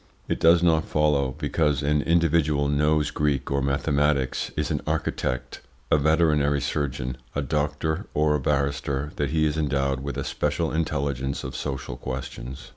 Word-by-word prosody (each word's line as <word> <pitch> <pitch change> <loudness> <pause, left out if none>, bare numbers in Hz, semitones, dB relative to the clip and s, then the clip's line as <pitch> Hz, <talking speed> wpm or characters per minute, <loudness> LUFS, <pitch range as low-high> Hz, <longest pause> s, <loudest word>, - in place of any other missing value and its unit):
It - - -1
does 85 +1 +5
not 80 -2 +3
follow 70 -4 +1
because 75 -3 0
an 75 +1 +2
individual 80 -3 +2
knows 75 +1 +2
Greek 70 -3 0
or 70 0 +1
mathematics, 70 -1 +1
is 75 -1 -1
an - - -1
architect, 65 -1 -2 0.3
a - - +6
veterinary 75 -2 +3
surgeon, 65 -3 -2 0.2
a 70 - 0
doctor, 75 - -1
or 75 0 +3
a 75 - +1
barrister, 70 +1 -1
that 70 -2 0
he 80 0 +2
is 75 0 0
endowed 70 -3 0
with 70 +1 -5
a - - -2
special 75 +2 -1
intelligence 70 -4 -2
of - - -6
social 65 -3 -4
questions. 65 0 -6
75 Hz, 155 wpm, -25 LUFS, 70-75 Hz, 0.3 s, a